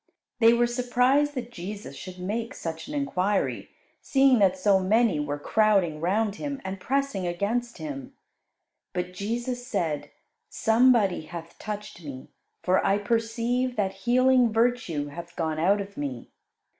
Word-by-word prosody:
They 230 -1 +7
were 240 0 +3
surprised 250 +4 +2
that 240 -2 -5
Jesus 200 +1 -7
should 185 -1 -9
make 215 +6 -3
such 165 +4 -5
an 295 - -6
enquiry, 205 -9 0 0.3
seeing 270 -3 +4
that 190 -2 +4
so 195 +1 +4
many 205 -2 +2
were 145 0 -2
crowding 185 -2 +2
round 205 +4 0
Him, 285 -2 -4
and 190 0 -4
pressing 270 -5 -1
against 225 +7 -2
Him. 145 -5 -7 0.8
But 180 0 -3
Jesus 240 +5 -3
said, 155 -9 -2 0.4
"Somebody 220 -8 +3
hath 165 0 -9
touched 210 -4 -6
Me, 135 -3 -9 0.3
for 185 +1 +3
I 195 - +3
perceive 230 +4 0
that 195 -4 0 0.2
healing 255 -1 +5
virtue 225 - 0
hath 170 +3 -9
gone 160 -2 -2
out 195 +5 +3
of 200 0 -6
Me." 135 -5 -5
205 Hz, 145 wpm, -26 LUFS, 175-240 Hz, 0.8 s, They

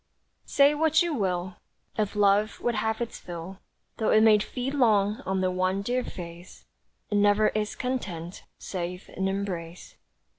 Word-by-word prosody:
Say 285 +1 +5
what 315 +2 +3
you 340 -2 -1
will, 185 -6 -2 0.4
If 210 -1 -1
love 205 +1 +3
would 240 - 0
have 220 +1 -1
its 235 -1 -4
fill, 175 +2 -8 0.4
Though 220 - 0
it 215 - +5
may 215 -1 +6
feed 250 +5 -3
long 215 -4 +3
on 190 0 0
the 185 0 +1
one 185 +2 0
dear 250 +4 0
face, 175 -2 -10 0.5
It 205 - +2
never 205 +1 +4
is 215 0 -2
content, 190 -10 -4
save 180 -1 -5
in 190 +1 0
embrace. 185 -3 -5
205 Hz, 155 wpm, -27 LUFS, 185-225 Hz, 0.5 s, may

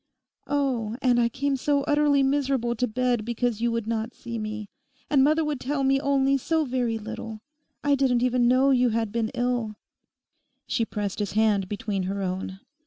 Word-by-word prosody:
'Oh, 260 -6 0
and 250 -2 +3
I 235 -1 +3
came 275 +3 -1
so 280 +1 +1
utterly 290 -1 +3
miserable 270 -3 +1
to 250 +2 0
bed 245 0 0
because 235 -1 -2
you 235 0 +1
would 230 -2 -2
not 225 +1 -3
see 235 -1 -6
me. 215 -1 -5 0.4
And 275 -3 +5
Mother 310 +3 +3
would 295 -3 -2
tell 275 +2 -2
me 270 0 +3
only 275 -1 +2
so 320 +3 0
very 245 -3 -1
little. 220 0 -7 0.4
I 285 - +3
didn't 260 -3 +2
even 250 -1 +2
know 260 +3 +4
you 250 -2 +4
had 225 -1 -1
been 225 -1 -1
ill.' 245 -3 -1 0.9
She 230 - 0
pressed 205 -2 -4
his 205 -2 -2
hand 210 -3 +2
between 205 -1 -2
her 200 +1 -3
own. 190 +1 -4
245 Hz, 180 wpm, -26 LUFS, 220-275 Hz, 0.9 s, And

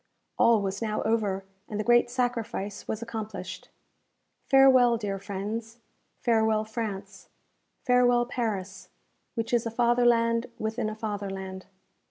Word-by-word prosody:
All 225 -3 +5
was 195 +1 -3
now 215 -2 -1
over 205 -4 0 0.2
and 210 - -4
the - - 0
great 240 +1 +4
sacrifice 235 -5 -3
was 220 +1 -3
accomplished. 220 -5 -6 0.8
Farewell, 260 -3 +6
dear 200 -3 -3
friends 210 +4 -5 0.4
Farewell, 220 -2 +2
France 200 -4 -6 0.6
Farewell, 245 -1 +4
Paris, 205 -6 -4 0.5
which 230 0 -3
is 235 -1 +2
a - - -1
fatherland 235 0 +3
within 220 0 -2
a 215 - -6
fatherland! 195 -3 -5
220 Hz, 120 wpm, -27 LUFS, 205-240 Hz, 0.8 s, Farewell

